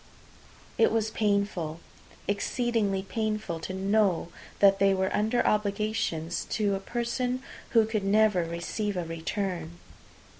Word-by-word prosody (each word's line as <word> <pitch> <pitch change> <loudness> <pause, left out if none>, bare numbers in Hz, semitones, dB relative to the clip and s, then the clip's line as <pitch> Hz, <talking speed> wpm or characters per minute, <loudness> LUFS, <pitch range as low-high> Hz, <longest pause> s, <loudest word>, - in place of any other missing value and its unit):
It 225 - +5
was 220 -1 0
painful, 200 -7 0 0.5
exceedingly 205 -1 0
painful, 215 -4 -2
to 170 - -5
know 195 -3 +2 0.3
that 195 -1 +5
they 195 0 +4
were 190 0 0
under 220 +4 +1
obligations 205 -5 0
to 210 -3 +1
a 195 - -1
person 245 +4 -2 0.3
who 225 -2 +5
could 215 -2 -2
never 205 -2 +4
receive 170 +5 -3
a 175 - -2
return. 170 0 -3
200 Hz, 120 wpm, -28 LUFS, 185-220 Hz, 0.5 s, It